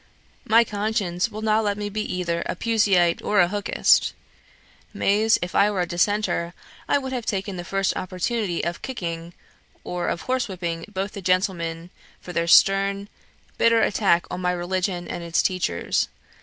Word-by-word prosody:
My 230 0 +5
conscience 205 -3 -1
will 215 0 -7
not 220 0 +2
let 205 -1 -1
me 205 0 -3
be 210 +1 -3
either 175 -4 -2
a - - -2
Puseyite 195 -5 +2
or 205 0 +1
a 175 - +6
Hookist; 205 +2 +2 0.8
mais, 215 +2 +3
if 180 - -5
I 205 - +4
were 200 -3 -1
a - - +1
Dissenter, 175 -1 0 0.3
I - - +4
would 265 -2 -4
have 245 -3 -4
taken 195 -1 -2
the 175 - -5
first 195 +2 -1
opportunity 185 +1 -2
of 170 +1 -3
kicking, 170 -9 -5 0.5
or 175 -1 -3
of 170 - -2
horse 255 -1 -1
whipping 170 -4 -4
both 195 0 -3
the 200 - -8
gentlemen 175 -2 -1 0.3
for 180 - -9
their 170 0 0
stern, 195 +2 +4 0.5
bitter 230 -1 +4
attack 190 -5 +2
on 180 - -4
my 180 0 +1
religion 180 0 -2
and 175 - -5
its 170 0 +1
teachers. 185 - 0
190 Hz, 170 wpm, -23 LUFS, 175-210 Hz, 0.8 s, a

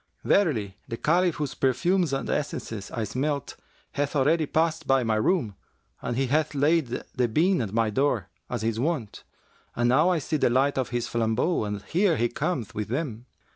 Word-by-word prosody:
Verily, 115 - +1
the 115 - -4
Caliph 175 +4 +2
whose 150 -3 -3
perfumes 160 +6 +1
and 135 - -2
essences 115 -8 -3
I 115 - -3
smelt, 140 +5 -2 0.4
hath 145 +1 -2
already 150 +3 +3
passed 160 +1 0
by 135 -1 +3
my 115 -1 +1
room 110 - +1 0.5
and 120 - -3
he 135 - +2
hath 155 +3 0
laid 150 +1 +3 0.3
the 125 -1 +1
bean 165 - +2
at 105 -5 -3
my 110 0 +1
door, 120 -5 +1 0.2
as 120 -3 -3
his 115 0 -1
wont; 135 -6 -2 0.5
and 120 0 +1
now 150 +8 +4
I 180 - +2
see 155 +1 -1
the 140 - +3
light 135 +3 +2
of 130 - -1
his 120 -1 -2
flambeaux, 115 +5 0
and 105 -1 -4
here 180 -2 +2
he 120 +1 +1
cometh 125 - -2
with 105 -1 -3
them.' 125 -2 -4
135 Hz, 185 wpm, -26 LUFS, 115-155 Hz, 0.5 s, now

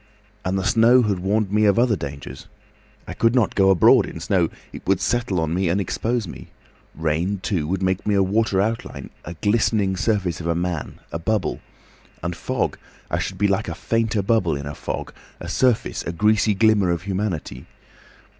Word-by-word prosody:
And 95 +1 -1
the 95 - -1
snow 115 +5 +5
had 100 -4 0
warned 100 +2 0
me 105 +1 +3
of 100 -2 +4
other 120 -2 +3
dangers. 70 -5 -8 0.6
I - - -5
could 115 +2 +2
not 120 -4 +2
go 95 -1 +4
abroad 95 -4 +5
in - - -8
snow—it - - -2
would 95 -2 +3
settle 120 -7 0
on 80 0 -1
me 90 0 +1
and 90 +4 +1
expose 115 +3 -1
me. - - -10 0.5
Rain, 80 +5 -1
too, 85 -7 -1
would 95 +2 -1
make 95 0 0
me 105 - +2
a 100 - +4
watery 100 0 +1
outline, 115 +2 -4
a 85 - -7
glistening 105 0 +1
surface 95 -4 -1
of 85 - -4
a 85 - +1
man—a 85 -2 -4
bubble. 105 +5 -1 0.6
And 85 0 -2
fog—I - - -4
should - - -4
be 100 - +2
like 95 -1 0
a 85 - -4
fainter 110 +1 0
bubble 95 -6 +2
in 70 0 -5
a 70 - -5
fog, - - -5 0.3
a - - -7
surface, 125 -3 +1
a - - -4
greasy 105 +4 +2
glimmer 110 -3 +3
of 85 0 -1
humanity. 95 - -3
95 Hz, 185 wpm, -22 LUFS, 85-110 Hz, 0.6 s, snow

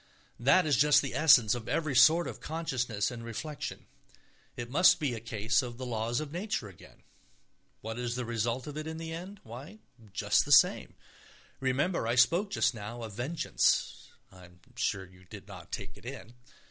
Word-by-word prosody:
That 140 +9 +4
is 150 -2 +2
just 150 0 +5
the 135 - -4
essence 125 -8 +6
of 120 -2 -5
every 155 -4 -1
sort 165 +6 +6
of - - -7
consciousness 130 -10 -2
and 120 -1 -8
reflection. 130 +6 -6 0.7
It 120 - -5
must 185 +6 +5
be 145 -5 -1
a 115 - -5
case 110 +1 0
of 120 -2 -7
the 130 - -6
laws 115 0 -2
of 155 -2 -6
nature 175 - -3
again. 95 -5 -16 0.8
What 115 +2 -6
is 120 -1 -2
the 125 -1 -3
result 120 +2 -2
of 150 - -7
it 155 0 -5
in 160 0 -5
the 160 0 -6
end? 185 +5 -8
Why, 135 - -10 0.3
just - - +2
the - - -6
same. - - +5 0.6
Remember 135 +3 0
I 120 - +1
spoke 170 - +3
just 130 - +1
now 115 +2 -7
of 110 -2 -7
vengeance. 130 +10 0 0.2
(I 90 -1 -14
am 90 0 -20 0.2
sure 95 -1 -1
you 95 0 -19
did - - -12
not - - -12
take - - -6
it - - -17
in.) 115 - -8
125 Hz, 185 wpm, -30 LUFS, 115-155 Hz, 0.8 s, essence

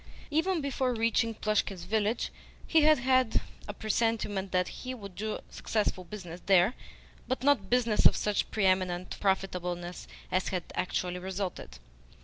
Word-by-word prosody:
Even 330 +3 +1
before 265 -3 0
reaching 230 0 +1
Plushkin's 210 -4 -1
village 215 +4 0 0.3
he 320 - +4
had 305 0 +6
had 255 -1 +3 0.3
a 205 - -4
presentiment 215 -3 0
that 180 -1 +2
he 255 0 -6
would 200 -5 -9
do 215 +3 -3
successful 210 -4 -1
business 175 -2 -8
there, 190 +3 +5 0.5
but 255 -1 -2
not 270 -9 +3
business 235 -4 +5
of - - 0
such 210 -1 0
pre 210 -3 0
eminent 185 -1 +1
profitableness 180 -3 -2 0.2
as 185 0 +1
had 180 -2 -2
actually 180 0 -2
resulted. 190 0 -5
210 Hz, 140 wpm, -30 LUFS, 185-235 Hz, 0.5 s, had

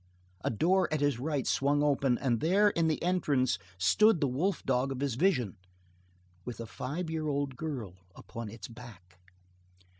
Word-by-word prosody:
A - - +1
door 180 - +2
at 155 - 0
his 145 -4 +1
right 145 0 -1
swung 145 +1 +2
open 135 -4 +2
and 120 -4 0
there 200 - +4
in 165 -3 +1
the 155 - 0
entrance 145 - +1 0.2
stood 180 - +4
the 145 - +2
wolf 160 +10 -1
dog 130 +1 +1
of 130 - -4
his 140 -2 -1
vision 125 - +1 0.9
with 120 +2 -7
a 115 - -4
five 155 +9 -5
year 160 -1 -2
old 140 -2 -1
girl 125 - -5 0.2
upon 115 -2 -8
its 115 +2 -9
back. 105 -7 -13
140 Hz, 170 wpm, -30 LUFS, 120-160 Hz, 0.9 s, there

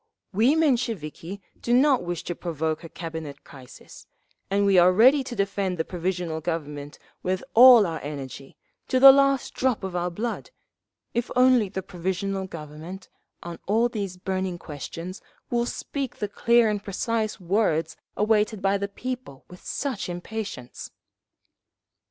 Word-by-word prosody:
"We 235 +9 +4
Mensheviki 220 - -1 0.2
do 240 - +2
not 270 0 +4
wish 175 -1 -4
to 175 - -3
provoke 160 -1 -3
a 165 - -9
Cabinet 160 -4 -7
crisis, 130 -3 -14 0.4
and 200 +1 +2
we 195 -2 +5
are 180 +1 +6
ready 260 +9 +5
to 250 -2 -7
defend 195 -2 -1
the 160 - -1
Provisional 175 -2 -3
Government 150 -3 -4 0.2
with 185 0 -2
all 245 -2 +9
our 165 -3 -3
energy, 140 -2 -8 0.3
to 255 - +2
the 270 +1 +11
last 275 -1 +2
drop 255 -5 0
of 190 -2 -4
our 175 0 0
blood—if 235 - -6
only 250 -4 +4
the 190 0 -5
Provisional 190 +2 -3
Government, 165 +3 -9 0.3
on 170 -1 -7
all 225 +4 +3
these 200 -5 -4
burning 185 -1 -3
questions, 165 +4 -7 0.3
will 240 0 +1
speak 275 -1 -4
the 210 - -3
clear 235 +3 +3
and 205 -1 -1
precise 215 +2 -2
words 170 -4 0 0.2
awaited 215 0 +2
by 195 +1 +1
the 200 - -2
people 250 - -7
with 180 - -13
such 260 -10 -3
impatience…." 175 - -6
190 Hz, 145 wpm, -25 LUFS, 170-230 Hz, 0.4 s, the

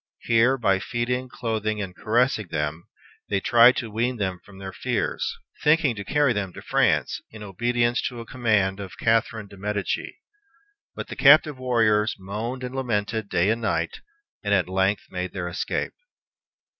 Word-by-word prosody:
Here, 120 +3 +3
by 100 -6 +2
feeding, 125 +4 -2
clothing, 110 -3 -2
and 95 -3 -5
caressing 115 -1 +1
them, 75 +1 -3 0.4
they 100 - +1
tried 120 +5 +6
to 115 -4 -4
wean 120 +3 -1
them 95 -4 -2
from 100 -2 -15
their 95 -1 -7
fears, - - -2 0.3
thinking 150 -3 +4
to 100 - -5
carry 145 +2 +2
them 100 -4 -3
to - - -9
France, - - +1
in 110 -1 -10
obedience 120 +4 0
to 125 -2 -7
a 115 - -7
command 105 -6 +1
of 95 -2 -8
Catherine 110 -1 +1
de 100 - -14
Medicis; 105 +1 -3 0.8
but - - -6
the - - -6
captive 145 0 +6
warriors 115 -4 +2
moaned 110 +7 -5
and 125 0 -5
lamented 110 -4 -2
day 90 +5 +2
and 115 +1 -1
night, 110 - -1 0.4
and 100 -1 +2
at 95 -3 +1
length 95 +2 +1
made 90 0 -4
their 95 -2 -3
escape. 90 - -3
110 Hz, 165 wpm, -24 LUFS, 100-120 Hz, 0.8 s, tried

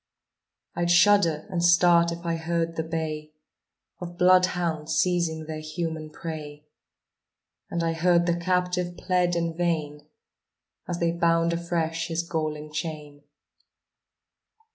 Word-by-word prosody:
I'd 175 0 -1
shudder 175 -3 +4
and 175 -2 -1
start 175 -1 +5
if 170 +1 -7
I 165 -1 0
heard 165 0 -2
the 160 - -1
bay 155 -1 -4 0.7
Of 175 -1 -8
bloodhounds 180 -4 +2
seizing 170 -3 0
their 155 0 -5
human 155 0 -4
prey, 150 -2 -8 1.0
And 170 -1 -2
I 165 0 0
heard 175 +1 +3
the 170 -1 +1
captive 180 0 -1
plead 180 -1 +1
in 165 -1 -1
vain 155 -4 -2 0.8
As 175 - -3
they 170 -1 +1
bound 170 0 +2
afresh 170 -1 -2
his 165 0 -2
galling 155 -2 -3
chain. 150 -2 -6
170 Hz, 120 wpm, -26 LUFS, 160-175 Hz, 1.0 s, start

